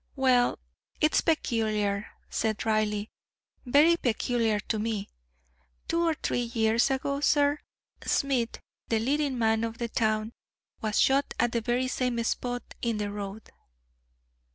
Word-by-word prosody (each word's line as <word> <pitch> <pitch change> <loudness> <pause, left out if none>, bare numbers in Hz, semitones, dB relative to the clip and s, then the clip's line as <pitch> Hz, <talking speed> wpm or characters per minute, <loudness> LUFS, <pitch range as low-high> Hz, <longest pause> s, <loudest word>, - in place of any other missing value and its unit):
"Well, 255 -3 +3 0.4
it's 305 - +3
peculiar," 215 -8 0 0.2
said 220 -1 -1
Reilly, 215 -1 0 0.6
"very 300 +7 +5
peculiar 230 -4 0
to 220 - -2
me. 215 -2 -2 0.8
Two 335 - +1
or 325 - +2
three 245 - -1
years 230 0 +2
ago, 280 +1 -1
sir, 290 0 +3 0.4
Smith, 255 -5 0 0.3
the 225 - +1
leading 275 +3 0
man 225 -1 +2
of 230 0 -3
the 235 -1 -3
town, 215 0 0 0.5
was 215 -1 0
shot 275 +1 +3
at 240 - +2
the 235 - 0
very 245 +3 0
same 250 -1 -1
spot 245 +2 -2 0.2
in 230 -2 0
the 205 -1 -2
road." 205 +1 -7
235 Hz, 130 wpm, -28 LUFS, 220-265 Hz, 0.8 s, very